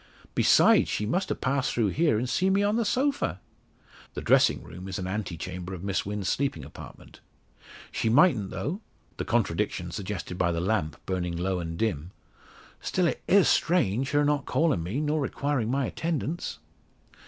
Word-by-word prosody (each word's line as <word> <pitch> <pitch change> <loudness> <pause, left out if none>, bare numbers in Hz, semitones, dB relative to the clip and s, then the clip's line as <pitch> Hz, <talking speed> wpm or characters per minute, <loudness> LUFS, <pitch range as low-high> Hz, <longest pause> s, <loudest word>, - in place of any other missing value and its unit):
Besides, - - +5
she 105 - -1
must 180 - -1
have - - -3
passed 130 0 0
through 115 -4 +1
here, 150 - +2
and 120 +4 -1
seen 185 +10 +2
me 200 +1 +3
on 205 +1 +2
the 230 -1 +1
sofa!" 260 - 0 0.8
The - - -3
dressing - - +3
room 90 +3 -9
is 95 - -4
an 95 - -4
ante 95 -3 -3
chamber 90 +1 -6
of 90 - -9
Miss 100 -1 -1
Wynn's 100 -2 -3
sleeping 130 - -1
apartment. 75 - -12 0.7
"She 110 - 0
mightn't 125 - +4
though," 185 +9 -4 0.4
the - - -3
contradiction - - 0
suggested 95 -2 -5
by 85 -1 +2
the 85 - -1
lamp 85 -5 -1
burning 90 -2 -2
low 90 +1 -1
and 85 -1 -5
dim, 90 -7 -1 0.7
"Still, 185 - 0
it 170 - -1
is 195 -1 +5
strange, 135 - +2
her 145 0 +2
not 145 -1 0
calling 155 - +2
me, 95 - -3
nor 150 0 0
requiring 140 -4 -1
my 135 +1 +1
attendance?" 160 - -3
110 Hz, 175 wpm, -27 LUFS, 90-150 Hz, 0.8 s, Besides